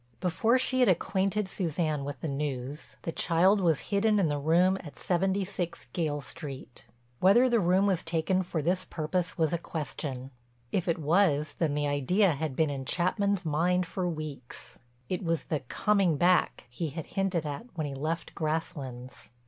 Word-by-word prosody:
Before 220 +8 +2
she 255 0 +1
had 250 - +5
acquainted 195 +3 +1
Suzanne 160 -5 -1
with 140 -2 -6
the - - -2
news, 140 0 -4
the 165 - -2
child 185 +6 +3
was 165 -1 +1
hidden 210 +1 +3
in 185 -6 +2
the 145 0 -1
room 175 +6 +3
at 150 - -11
76 185 -3 -1
Gayle 150 -4 -1
Street. 135 -3 -9 0.3
Whether 215 +8 +6
the 240 -2 +3
room 185 +1 +3
was 190 -4 +2
taken 165 +3 0
for 170 -4 -3
this 180 +3 +1
purpose 175 +2 -2
was 160 -2 +1
a 170 - 0
question. 135 -5 -5 0.4
If 185 - 0
it 170 - +1
was 155 -1 +2
then 155 -4 +1
the 145 0 0
idea 170 +8 +2
had 150 -2 -3
been 155 -1 +2
in 135 -1 -4
Chapman's 185 +5 0
mind 175 +4 +2
for 180 +1 -2
weeks—it 135 - -7
was 165 -3 0
the 155 - -2
"coming 185 +4 +1
back" 180 +3 +2
he 155 +6 -3
had 160 +2 -6
hinted 190 -5 -1
at 150 +11 -5
when 155 - -2
he 140 - -4
left 155 +5 -3
Grasslands. 135 -5 -4
165 Hz, 170 wpm, -29 LUFS, 145-185 Hz, 0.4 s, Whether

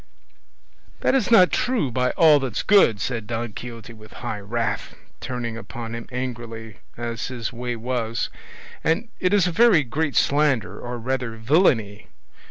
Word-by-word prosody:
"That - - +2
is 265 -1 +2
not 200 -6 +6
true, 240 - 0
by 125 +1 +1
all 155 -3 +7
that's 130 -6 -3
good," 190 - +5
said 115 -1 -3
Don 115 -1 -3
Quixote 115 -1 -8
in 110 -1 -14
high 105 - -5
wrath, 110 +1 -3 0.2
turning 120 -3 -4
upon 115 0 -7
him 115 0 -6
angrily, 115 -4 -6 0.2
as 115 -1 -4
his 120 -3 -5
way 120 0 -4
was; 115 -1 -2 0.5
"and 165 +8 0
it 185 - +1
is 205 -3 +4
a 180 - 0
very 210 -4 +5
great 145 +3 -2
slander, 135 - +2
or 120 0 -5
rather 125 -1 -3
villainy. 110 - +2
120 Hz, 155 wpm, -23 LUFS, 115-145 Hz, 0.5 s, all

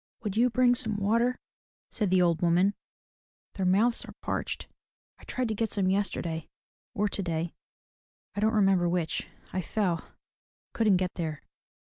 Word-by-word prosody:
*' - - -40
Would 205 -3 -2
you 240 +3 +4
bring 250 0 +4
some 220 -4 0
water?'* 230 +5 +2 0.5
said 210 -3 0
the 185 0 +4
old 170 -2 +2
woman, 175 +3 +3 0.8
"their 190 -2 -1
mouths 220 +6 +3
are - - -11
parched. - - -3 0.5
I - - -17
tried 255 -1 -1
to - - 0
get 220 +1 -1
some, 190 -2 +2
yesterday 170 -5 -1 0.5
or 210 -1 +2
today, 170 -4 -2 0.4
— - - -50
I - - -2
don't 220 +2 +2
remember 195 -4 +4
which 170 -2 -1
— - - -27
I 185 - 0
fell, 180 -4 -1 0.7
couldn't 215 -5 +4
get 180 0 -1
there. 160 -4 -3
195 Hz, 165 wpm, -29 LUFS, 175-220 Hz, 0.8 s, you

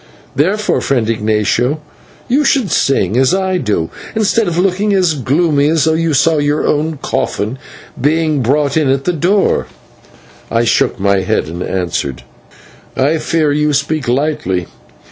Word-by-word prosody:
Therefore, 200 +9 +1
friend 125 -5 0
Ignatio, 110 +5 0 0.5
you 275 +5 +2
should 260 - +1
sing, 110 -10 +1
as 130 +6 +3
I 190 -1 0
do, 100 -9 -1 0.2
instead 220 0 +1
of 170 -1 -2
looking 195 +3 +1
as 180 -4 +2
gloomy 145 +2 +1
as 160 -1 +2
though 160 - +2
you 160 -1 0
saw 155 +2 +3
your 145 +1 0
own 155 +1 0
coffin 130 -2 -2 0.5
being 155 -2 0
brought 140 +4 +1
in 155 -4 +2
at 135 0 +1
the 180 - 0
door." 185 +5 +1 0.8
I 115 0 +1
shook 115 -3 +1
my 100 0 +2
head, 95 - 0
and 85 +3 -6
answered: 85 -8 -3 0.7
"I 145 +5 +2
fear 155 -2 0
you 150 +1 +1
speak 145 -1 -1
lightly. 120 - -1
150 Hz, 150 wpm, -15 LUFS, 120-165 Hz, 0.8 s, as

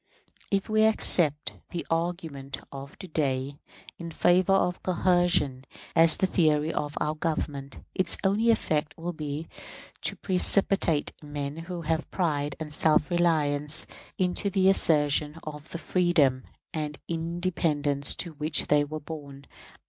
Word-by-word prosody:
If 195 -1 0
we 215 0 +2
accept 155 -8 +4 0.2
the 175 - -5
argument 165 -5 -3
of 140 0 -9
to 185 - -9
day 140 -3 -2 0.4
in 170 -1 -6
favor 180 +3 +3
of 180 -2 +1
coercion 175 -7 +1 0.3
as 165 -1 +5
the - - +2
theory 155 -3 +2
of 145 -1 -3
our 150 - 0
Government, 150 -3 -3 0.2
its 185 -2 0
only 205 +4 +2
effect 155 -8 0
will 170 +1 -4
be 155 0 -5 0.5
to - - -1
precipitate 185 -4 +2
men 145 -1 -5
who 170 +1 -6
have 160 0 -1
pride 145 -6 -1
and 155 -2 -6
self 155 0 +2
reliance 155 -3 +1 0.3
into 185 +2 0
the 190 0 +4
assertion 150 -3 +2
of 150 0 -8
the - - -5
freedom 165 -8 +2 0.3
and 150 -2 -4
independence 165 -4 0
to 170 - -4
which 150 +1 -2
they 145 0 +4
were 155 +1 -5
born. 145 -2 -9
155 Hz, 135 wpm, -27 LUFS, 145-175 Hz, 0.5 s, as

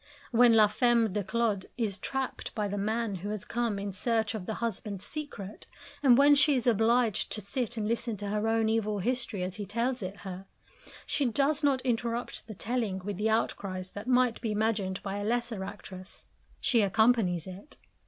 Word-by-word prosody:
When 240 -1 +6
la 215 -1 +7
femme 230 0 +2
de 205 0 -1
Claude 210 -1 0
is 210 -5 -2
trapped 265 +5 -3
by 210 -2 0
the 200 - -3
man 215 0 -1
who 195 +4 -5
has 210 -2 -4
come 235 -3 -1
in 200 0 -4
search 220 +1 0
of 205 -5 -5
the 220 - -2
husband's 210 -4 -3
secret, 260 -10 -6 0.3
and 255 -4 +6
when 285 +1 +7
she 285 0 +5
is 250 - 0
obliged 230 -1 +2
to - - -2
sit 230 +3 -3
and 210 -1 -1
listen 230 -1 -1
to 205 +1 -4
her 210 +1 0
own 225 0 +2
evil 215 -2 0
history 225 -2 -1
as 185 +2 -4
he 205 - -4
tells 235 +5 -1
it 190 0 -6
her, 190 -1 -7 0.6
she 285 - +1
does 280 +5 +2
not 275 -3 +3
interrupt 240 -2 -2
the 215 - -8
telling 225 -3 -1
with 205 -2 -3
the 215 +2 +1
outcries 190 -4 -1
that 205 +3 -8
might 250 -2 +3
be 225 -3 -1
imagined 210 -3 -1
by 200 0 -3
a 205 - -3
lesser 235 -2 -1
actress, 185 0 -9 0.3
she 235 -3 +3
accompanies 200 -4 +3
it. 190 +9 -10
220 Hz, 195 wpm, -29 LUFS, 200-240 Hz, 0.6 s, la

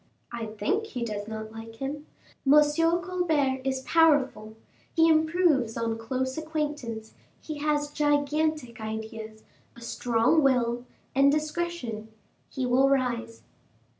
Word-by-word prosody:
"I 235 -2 -4
think 395 - -1
he 250 - -4
does 205 -2 -4
not 220 0 -6
like 225 0 -9
him. 285 +5 -5 0.4
M. - - +8
Colbert 330 -3 +1
is 265 0 -1
powerful; 270 -10 +3 0.4
he 325 -1 +5
improves 315 -7 +3
on 230 -1 -1
close 260 +4 -2
acquaintance; 295 -8 -4 0.3
he 305 -2 -7
has 295 0 0
gigantic 295 -3 0
ideas, 220 0 -6 0.3
a 235 - -14
strong 235 +5 +2
will, 245 -3 +2 0.3
and 275 +1 +5
discretion; 305 -7 -2 0.4
he 265 - -3
will 260 +2 +4
rise." 240 -4 -1
265 Hz, 120 wpm, -27 LUFS, 230-305 Hz, 0.4 s, M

